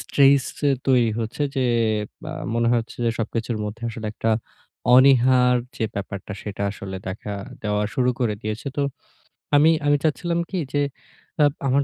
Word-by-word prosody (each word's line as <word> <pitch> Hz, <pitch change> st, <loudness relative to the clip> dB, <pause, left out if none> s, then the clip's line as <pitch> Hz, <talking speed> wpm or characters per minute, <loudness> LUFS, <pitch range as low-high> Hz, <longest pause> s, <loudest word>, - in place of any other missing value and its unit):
Stress 140 Hz, -1 st, +4 dB, 0.4 s
তৈরি 125 Hz, -4 st, +4 dB
হচ্ছে 115 Hz, +6 st, -3 dB
যে 130 Hz, -, +2 dB, 0.7 s
আ -, -, -5 dB, 0.2 s
মনে 115 Hz, 0 st, +2 dB
হচ্ছে 115 Hz, -1 st, -2 dB
যে 115 Hz, -, +3 dB
সবকিছুর 115 Hz, 0 st, -2 dB
মধ্যে 105 Hz, +3 st, -6 dB
আসলে 110 Hz, -1 st, -6 dB
একটা 115 Hz, -, -1 dB, 0.6 s
অনীহার 125 Hz, -1 st, +6 dB, 0.2 s
যে 110 Hz, -, -1 dB
ব্যাপারটা, 100 Hz, 0 st, -5 dB
সেটা 100 Hz, -1 st, -5 dB
আসলে 95 Hz, -1 st, -7 dB
দেখা 100 Hz, +2 st, -5 dB, 0.3 s
দেওয়া 105 Hz, 0 st, 0 dB
শুরু 125 Hz, -1 st, +2 dB
করে 110 Hz, -4 st, +1 dB
দিয়েছে। 110 Hz, +4 st, -4 dB
তো 145 Hz, -, +1 dB, 0.7 s
আমি 150 Hz, +2 st, +6 dB, 0.2 s
আমি 145 Hz, 0 st, +4 dB
চাচ্ছিলাম 170 Hz, +2 st, 0 dB
কী 185 Hz, -, -2 dB
যে 145 Hz, -, +2 dB, 0.6 s
আপ 145 Hz, -, +2 dB
আমার 140 Hz, +2 st, +3 dB
120 Hz, 150 wpm, -23 LUFS, 110-135 Hz, 0.7 s, অনীহার